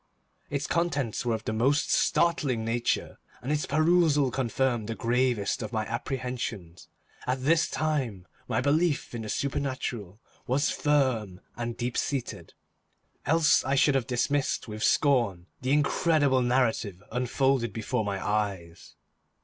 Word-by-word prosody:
Its 140 0 -2
contents 145 -9 -1
were 115 - +2
of 110 - -7
the 110 - -3
most 135 +7 +2
startling 140 -9 +2
nature, 115 +1 -1 0.2
and 130 - -4
its 150 0 0
perusal 155 -3 +3
confirmed 125 -3 0
the 115 - -3
gravest 120 -2 0
of 110 -2 -5
my 110 -2 -1
apprehensions. 120 -7 -5 0.4
At 130 +1 -1
this 160 +3 +3
time, 130 -12 -2 0.2
my - - 0
belief 150 +2 +1
in 120 - -4
the 110 - -6
supernatural 130 -8 -3 0.3
was 140 +4 +1
firm 130 -10 0 0.2
and 120 -1 -4
deep 120 0 -3
seated, 135 -4 -4 0.7
else 160 0 +4
I 135 +1 0
should 140 +1 +4
have 135 -2 0
dismissed 135 +3 0
with 110 0 -5
scorn 120 - +2 0.2
the 130 - -3
incredible 145 -2 +3
narrative 120 -6 0
unfolded 125 0 +1
before 115 +3 -2
my 100 -1 -2
eyes. 100 -5 -3
125 Hz, 135 wpm, -27 LUFS, 110-140 Hz, 0.7 s, else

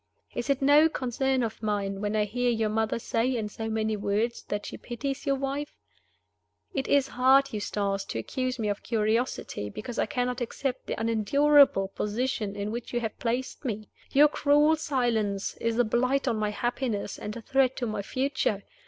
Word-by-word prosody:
Is 240 - -4
it 275 -1 +1
no 295 +3 +6
concern 265 -1 0
of 220 -1 -4
mine 200 -2 -1
when 210 0 -1
I 210 -1 +2
hear 245 +4 0
your 225 -2 +1
mother 220 +1 0
say, 235 +2 0
in 215 -2 -2
so 225 +1 -5
many 220 0 0
words, 210 +3 -1
that 205 0 -3
she - - -6
pities 270 +3 -5
your 275 - +3
wife? 275 +2 -3 1.0
It 270 -1 -2
is 280 -1 +3
hard, 265 +2 +4
Eustace, 200 -1 -1
to - - -5
accuse 255 - -2
me 220 -3 -1
of 205 -1 -2
curiosity 220 - -1
because 235 - -6
I - - +1
cannot 250 0 -1
accept 250 +2 -3
the - - -3
unendurable 230 0 +4
position 210 0 -2
in 205 +1 -3
which 235 +1 -5
you 240 - +1
have 225 -2 -4
placed 245 +4 -2
me. 215 -5 -4 0.2
Your 290 +2 +6
cruel 295 +1 +4
silence 240 -9 -1
is 230 0 -1
a 245 - +5
blight 255 +5 +1
on 235 - +2
my 210 -1 0
happiness 230 -1 -2
and 210 +2 -5
a - - -7
threat 265 0 +2
to 245 - -1
my 215 -2 -2
future. 255 -3 -1
235 Hz, 185 wpm, -28 LUFS, 210-265 Hz, 1.0 s, no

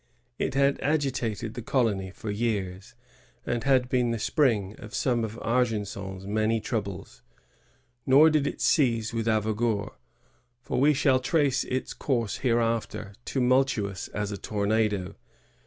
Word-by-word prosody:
It - - -1
had 140 0 +3
agi 145 -1 +1
tated 115 -3 -3
the 120 - -6
colony 110 -6 0
for 105 +3 -6
years, 100 -4 -3 0.5
and 120 -1 -1
had 130 -2 +3
been 125 -1 +1
the 115 - -1
spring 110 - +1
of 110 -3 -9
some 120 -3 +1
of 110 0 -4
Argenson^s 105 -6 -2
many 110 +2 +1
troubles* 100 -4 -5 0.9
Nor 145 +4 +7
did 150 -2 +2
it - - -5
cease 115 -7 +2
with 115 -1 -2
Avaugour, 110 -1 0 0.7
for 125 - -3
we 150 +1 +5
shall 135 -2 +3
trace 140 -1 +1
its 130 0 -3
oouise 120 -6 -1
hereafter, 115 -4 -1
tumultuous 125 -7 +1
as 105 -1 -4
a 100 - -4
tornado. 105 -2 0
115 Hz, 140 wpm, -27 LUFS, 105-130 Hz, 0.9 s, Nor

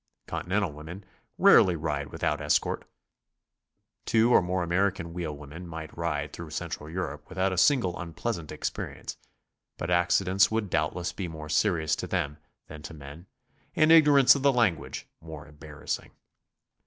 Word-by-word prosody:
Continental 95 -1 -1
women 80 +6 -10 0.3
rarely 90 -2 +6
ride 75 -3 -3
without - - -2
escort. - - 0 1.2
Two 115 +2 +4
or - - +7
more 90 0 -1
American 85 -1 0
wheelwomen 80 0 -6
might 80 -1 -8
ride 75 -3 -3
through 85 -2 -8
Central 75 -1 -5
Europe 80 -4 -5
without 95 0 0
a - - -4
single 110 -9 +3
unpleasant 85 0 -4
experience, - - -5 0.6
but 85 - -4
accidents 90 +2 +3
would 110 -4 -2
doubtless 85 +2 -1
be 95 - -4
more 80 -2 -8
serious 80 -2 +1
to - - -4
them 75 +1 -2 0.3
than 75 0 -11
to 80 +2 -9
men, 75 +4 -11 0.5
and 155 0 +4
ignorance 145 -5 +7
of 140 - -3
the 140 0 +4
language 115 -10 0 0.2
more 80 -2 -9
embarrassing. 75 0 -6
85 Hz, 140 wpm, -27 LUFS, 75-95 Hz, 1.2 s, or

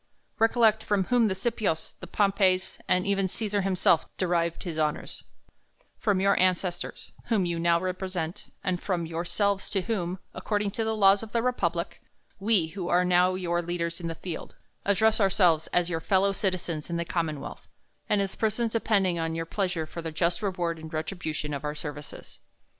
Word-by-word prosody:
Recollect 225 -1 +4
from 205 -2 +1
whom 240 +3 +3
the 190 - 0
Scipios, 195 -5 -1
the 185 - -8
Pompeys, 195 -1 +2
and 185 0 +2
even 195 -1 +1
Cesar 205 +1 0
himself 185 -4 +3
derived 170 -2 0
his 165 -3 -4
honors; 150 -1 -2 0.7
from 205 -4 +2
your 200 +1 +4
an 185 0 +5
cestors, 175 0 -5
whom 210 -6 +1
you 170 -1 -1
now 170 0 +3
represent, 185 -1 -4
and 180 -2 -1
from 175 -4 -1
yourselves, 185 +5 -1
to 195 - 0
whom, 185 -4 -2 0.2
according 205 +2 -1
to 225 - -2
the 220 0 0
laws 195 -1 +5
of 225 -1 -9
the 230 -1 +1
republic, 175 -9 -1 0.4
we, 195 -5 +2
who 175 +1 -5
are 180 +1 +4
now 180 +1 +4
your 175 -2 0
leaders 170 0 -3
in 170 - -3
the 165 - -3
field, 170 -1 -7 0.3
address 220 +2 +3
ourselves 180 -5 +4
as 175 -1 +2
your 165 -2 -2
fellow 195 +2 +2
citizens 180 -6 -2
in 170 - -1
the 170 - -2
commonwealth, 165 -4 -3 0.4
and 205 - +3
as 195 - -4
persons 220 +1 0
depending 195 -6 +2
on 165 0 -1
your 165 0 -2
pleasure 180 -2 -1
for 170 +2 -7
the 165 -1 -4
just 170 +3 0
reward 175 -5 -1
and 160 0 -9
retribution 155 -2 -3
of 140 0 -4
our 150 0 -3
services. 150 -1 -7
185 Hz, 180 wpm, -27 LUFS, 170-200 Hz, 0.7 s, an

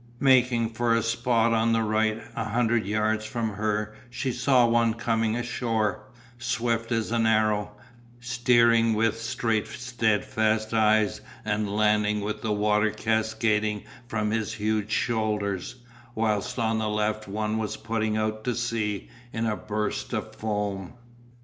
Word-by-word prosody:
Making 125 -4 +4
for 115 0 +1
a 115 - +1
spot 115 0 +2
on 115 0 +2
the 115 0 +2
right, 110 +1 0
a 115 - -2
hundred 115 -1 +1
yards 110 +1 0
from 110 0 -2
her 105 +1 -2 0.2
she 130 +2 -2
saw 125 0 +3
one 115 -1 +2
coming 115 -1 0
ashore, 115 -4 -1 0.3
swift 115 -1 -1
as 115 -1 0
an 115 -1 +2
arrow, 105 -1 +2 0.5
steering 120 -2 +3
with 115 +1 +1
straight 115 -3 -1
steadfast 110 -2 0
eyes 110 -1 +3 0.2
and 105 -1 -1
landing 105 0 +2
with 105 +1 -3
the 110 - -1
water 105 +1 +2
cascading 110 -1 0 0.2
from 105 -2 -1
his 110 -1 -1
huge 105 -1 -1
shoulders, 105 -4 -1 0.4
whilst 110 +2 0
on 110 -1 +1
the 110 -1 -1
left 105 0 -1
one 105 +2 -2
was 110 -1 -3
putting 110 -1 -1
out 110 0 -2
to 125 -2 0
sea 115 -4 -2 0.2
in 115 0 -2
a 110 -1 0
burst 105 0 -3
of - - -3
foam. 105 -3 -3
110 Hz, 145 wpm, -26 LUFS, 105-115 Hz, 0.5 s, Making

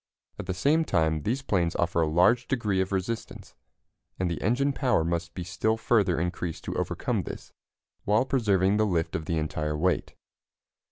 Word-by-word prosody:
At - - -6
the 95 - -2
same 150 - +3
time 80 - +1
these 125 - -2
planes 85 -8 0
offer 85 0 +1
a 80 - +2
large 90 +10 +3
degree 105 -8 0
of 95 - -2
resistance, 100 +4 -4 0.6
and 90 -2 -1
the 85 - -4
engine 135 +7 +1
power 125 - +2
must 85 +1 -2
be 90 - -4
still 90 +5 0
further 105 -7 +2
increased 85 -1 -3
to - - -4
overcome - - -1
this, - - -9 0.5
while 105 +5 +2
preserving 105 -7 +2
the 110 0 +2
lift 85 -4 -1
of 80 - -3
the 80 +1 -1
entire 75 -1 -2
weight. 90 +3 0
95 Hz, 175 wpm, -27 LUFS, 85-110 Hz, 0.6 s, same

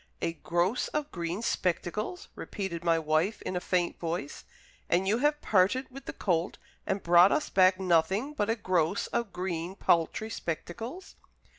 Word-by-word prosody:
"A 165 - -1
gross 175 +8 0
of 300 -1 -3
green 175 +4 -3
spectacles!" 210 - -2
repeated 190 -5 -5
my 165 -1 +3
wife, 160 +6 +1
in 185 - -3
a - - +1
faint 180 -1 -1
voice. 165 -4 -4 0.4
"And 180 +3 +2
you 215 +4 +2
have 295 +2 +1
parted 215 +8 +2
with 275 +2 -10
the - - -5
colt 175 -2 -1 0.3
and 195 +1 -1
brought 175 +2 +7
us 305 - 0
back 185 0 +5
nothing 190 - +1
but 215 -8 -1
a 225 - +2
gross 185 -4 0
of 235 -4 -2
green 180 0 -3
paltry 185 +5 +1
spectacles!" 225 - -6
185 Hz, 160 wpm, -29 LUFS, 170-225 Hz, 0.4 s, brought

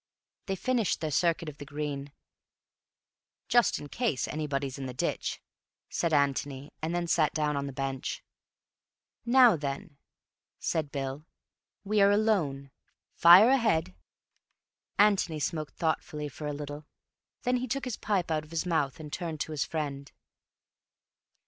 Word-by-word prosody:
They 195 - -1
finished 235 +1 0
their 155 -2 -2
circuit 170 +1 +1
of 145 -1 -8
the 145 - -7 1.9
green—"Just 240 -1 +4
in 145 - -8
case 185 - -1
anybody's 140 -3 -3
in 135 - -4
the 125 - -7
ditch," - - -2 0.5
said 170 - 0
Antony—and 145 +2 -1
then 175 0 0
sat 160 -3 +2
down 150 -1 +1
on 140 0 -2
the - - -5
bench. 135 -1 -4 1.0
"Now 245 -4 +7
then," 145 +1 -5 0.6
said 155 -3 -2
Bill, 140 +2 -4 0.6
"We 210 0 +2
are 200 - +7
alone. 180 -11 +1 0.4
Fire 180 +7 +8
ahead." 220 - +2 1.0
Antony 200 -6 +3
smoked 155 0 -3
thoughtfully 150 -2 -2
for 150 +2 -7
a - - -1
little. 145 +1 -7 0.6
Then 250 0 +2
he 255 +1 -3
took 275 +3 -2
his 250 -4 -3
pipe 195 -5 -1
out 155 -1 0
of 155 - -16
his 165 +2 -2
mouth 160 -6 0
and 150 -1 -9
turned 165 -3 -4
to - - -3
his 150 -3 -1
friend. 140 -3 -4
155 Hz, 140 wpm, -29 LUFS, 145-190 Hz, 1.9 s, Fire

